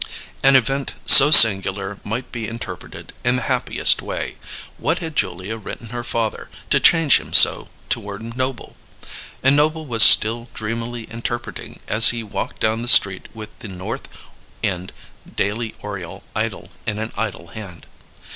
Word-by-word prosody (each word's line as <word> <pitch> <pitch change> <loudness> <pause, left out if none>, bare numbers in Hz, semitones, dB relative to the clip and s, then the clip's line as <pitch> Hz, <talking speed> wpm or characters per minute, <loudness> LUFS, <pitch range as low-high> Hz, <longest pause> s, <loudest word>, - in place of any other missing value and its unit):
An 135 0 +3
event 135 +2 -1
so 135 - +9
singular 100 -5 +5
might 115 +5 -7
be 115 -3 -7
interpreted 115 +1 -11
in 125 +1 0
the 125 - -2
happiest - - +1
way: - - -7 0.4
What 165 +4 -2
had 160 -3 -8
Julia 95 +1 -5
written 115 +1 -10
her 120 +1 -7
father, 115 -2 -5 0.2
to - - +2
change 165 -4 +3
him - - -14
so - - +6 0.2
toward 105 +3 -6
Noble? 130 -1 -6 0.7
And 135 +2 +2
Noble 155 +2 -1
was 115 -5 -1
still 115 +3 +7
dreamily 115 +2 -6
interpreting 120 +1 -8
as 110 +2 +4
he 120 -1 -6
walked 105 - -8
down 110 +1 -2
the 120 - -7
street 100 -5 +5
with 110 -1 -11
The - - -10
North 100 +7 -9 0.6
End 90 -1 -5 0.4
Daily 110 +3 -4
Oriole 95 -5 -10
idle - - -6 0.2
in 105 - -4
an 110 +1 -6
idle 100 -6 -6
hand. 95 -4 -12
115 Hz, 150 wpm, -18 LUFS, 105-125 Hz, 0.7 s, so